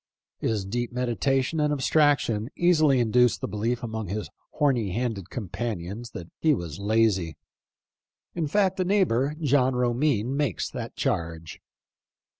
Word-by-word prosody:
His 105 Hz, -4 st, -1 dB
deep 120 Hz, +4 st, -3 dB
meditation 130 Hz, +4 st, 0 dB
and 150 Hz, 0 st, +2 dB
abstraction 140 Hz, -6 st, +2 dB
easily 155 Hz, -6 st, +4 dB
induced 120 Hz, -4 st, +3 dB
the -, -, -3 dB
belief 115 Hz, +4 st, -2 dB
among 110 Hz, -2 st, -4 dB
his 105 Hz, +4 st, -4 dB, 0.2 s
horny 125 Hz, -, +1 dB
handed 110 Hz, -5 st, -3 dB
companions 105 Hz, 0 st, -5 dB
that 85 Hz, -, -6 dB
he 155 Hz, -2 st, +3 dB
was 85 Hz, -, -6 dB
lazy. 100 Hz, -5 st, +1 dB, 1.0 s
In 165 Hz, -3 st, -1 dB
fact, 190 Hz, +3 st, +1 dB
a -, -, +3 dB
neighbor, 155 Hz, -, +2 dB
John 135 Hz, -4 st, +2 dB
Romine, 125 Hz, 0 st, +1 dB
makes 140 Hz, -8 st, -1 dB
that -, -, -6 dB
charge. 80 Hz, -1 st, -3 dB
120 Hz, 130 wpm, -26 LUFS, 105-145 Hz, 1.0 s, easily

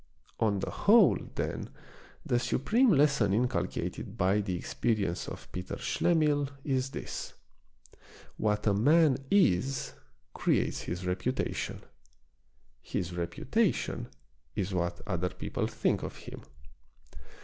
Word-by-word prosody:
On 105 Hz, -3 st, +2 dB
the -, -, -3 dB
whole, 210 Hz, -2 st, +5 dB, 0.2 s
then, -, -, -3 dB, 0.6 s
the 120 Hz, -, +2 dB
supreme 230 Hz, -, +2 dB
lesson 140 Hz, -, +4 dB
inculcated 125 Hz, +2 st, -2 dB
by 95 Hz, +3 st, +3 dB
the 95 Hz, -3 st, -2 dB
experience 100 Hz, 0 st, -1 dB
of -, -, -9 dB
Peter 90 Hz, 0 st, -5 dB
Schlemihl 150 Hz, -4 st, +1 dB
is 130 Hz, -2 st, 0 dB
this: -, -, -6 dB, 1.0 s
What 105 Hz, -1 st, 0 dB
a 105 Hz, -, +4 dB
man 145 Hz, +6 st, +4 dB
is, 135 Hz, -, +2 dB, 0.4 s
creates -, -, +1 dB
his 90 Hz, +2 st, -4 dB
reputation. 95 Hz, +8 st, -2 dB, 1.0 s
His 90 Hz, 0 st, -3 dB
reputation 135 Hz, -, -1 dB, 0.5 s
is 95 Hz, 0 st, -2 dB
what 85 Hz, -1 st, -1 dB
other 90 Hz, 0 st, -1 dB
people 90 Hz, -, -3 dB
think -, -, 0 dB
of -, -, -5 dB
him. -, -, -10 dB
115 Hz, 110 wpm, -30 LUFS, 90-145 Hz, 1.0 s, whole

